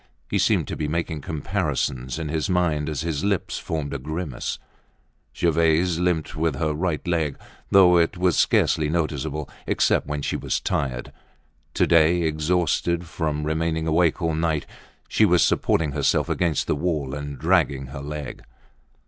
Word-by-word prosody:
He - - +1
seemed - - +2
to - - -4
be 75 - -2
making 80 0 -2
comparisons 75 -5 -2
in 80 -2 -4
his 80 +3 -2
mind 80 -5 +1
as 75 -1 -3
his 80 -3 -2
lips 100 -2 -1
formed 75 -3 -4
a 70 - -3
grimace. 75 -1 -4 0.8
Gervaise 85 +1 +2
limped 90 -3 0
with 80 -2 0
her 75 +2 -1
right 80 +1 -2
leg, 80 -5 0 0.3
though 90 -2 +6
it 85 +2 +1
was 90 -1 +2
scarcely 75 -2 +2
noticeable 75 -3 -2 0.2
except - - +2
when 75 -1 -3
she - - -1
was - - -1
tired. 65 -3 -2 0.6
To - - +3
day, 85 +1 +4
exhausted 85 +2 0
from 75 -3 -2
remaining 80 +1 -1
awake 85 +2 +2
all 80 -1 +1
night, 80 -1 0 0.4
she - - +2
was 90 -4 +5
supporting 80 -3 +1
herself - - +1
against 85 -5 0
the - - 0
wall 75 -4 -2
and 75 -1 -5
dragging 80 -3 +2
her 70 - -6
leg. 75 -1 -6
80 Hz, 155 wpm, -24 LUFS, 75-85 Hz, 0.8 s, though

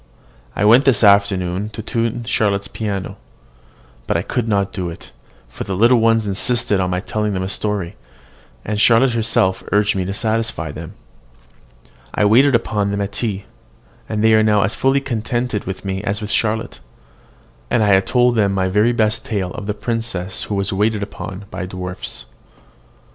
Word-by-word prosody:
I 105 - +1
went 120 +6 +6
this 125 -5 +4
afternoon 100 -1 +3
to 110 - -6
tune 115 +1 -2
Charlotte's 100 -4 0
piano. 100 -2 -4 0.9
But - - +1
I - - -2
could 120 -3 -2
not 100 -2 0
do 90 -2 -3
it, 85 - -11 0.4
for - - -7
the 95 - -4
little 120 +5 +5
ones 115 -1 +3
insisted 105 +1 +1
on 90 -1 0
my 90 0 -1
telling 105 0 -2
them 95 - -2
a - - -2
story; 105 -3 -3 0.7
and 105 0 -1
Charlotte 120 +3 +5
herself 95 -5 +1
urged 105 0 +2
me 95 - 0
to 95 - -3
satisfy 110 -7 -2
them. 80 +2 -9 1.2
I 105 - +2
waited 125 +6 +5
upon 105 -3 0
them 100 0 -2
at 100 0 -3
tea, 100 -3 -3 0.6
and 105 0 -1
they 110 0 +5
are 110 - +5
now 105 -2 +3
as 95 - -1
fully 135 +1 +1
contented 120 -3 -2
with 95 +1 -6
me 95 +1 -3
as 100 0 -2
with 105 -1 -5
Charlotte; 110 0 -1 0.9
and 110 - +2
I 100 -2 +5
told 125 +5 +2
them 100 -4 +2
my 95 -1 0
very 105 +5 +2
best 110 0 +1
tale 95 -5 -3
of 100 - -7
the 105 - -2
princess 105 -4 -3
who 105 - -3
was 100 -1 -1
waited 105 +1 0
upon 100 -1 -7
by 90 - -5
dwarfs. 90 -7 -5
105 Hz, 175 wpm, -19 LUFS, 95-115 Hz, 1.2 s, went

